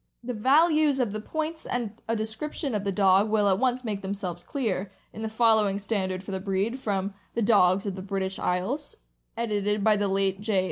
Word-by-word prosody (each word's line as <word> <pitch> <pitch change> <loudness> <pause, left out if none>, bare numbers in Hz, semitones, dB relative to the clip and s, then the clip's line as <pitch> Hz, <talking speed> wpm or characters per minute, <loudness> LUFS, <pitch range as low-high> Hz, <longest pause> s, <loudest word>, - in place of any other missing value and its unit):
325 245 0 -4
The 215 +5 -1 0.3
values 290 -3 +2
of 240 -5 +1
the 215 - -3
points 315 +6 -4
and 230 -3 -3
a 230 - 0
description 225 +6 -4
of 205 -2 -1
the 200 - 0
dog 195 +1 +4
will 210 -1 +3
at 190 -1 +3
once 255 0 +1
make 210 -4 -3
themselves 190 -3 -4
clear, 205 -8 -2 0.2
in 220 - -8
the 220 - -2
following 220 -3 +3
stand 200 -2 -1
ard 185 0 -5
for 195 - -7
the 190 - -2
breed, 195 +6 -1
from 200 -4 -2
" - - -37
The 230 - +1
Dogs 195 -3 +4
of 195 -2 -3
the 190 - -6
British 190 0 -3
Isles," 245 - -2 0.4
edited 210 -2 0
by 215 -1 +4
the 205 0 +1
late 195 0 +1
J. 210 -2 +1
205 Hz, 220 wpm, -27 LUFS, 195-230 Hz, 0.4 s, dog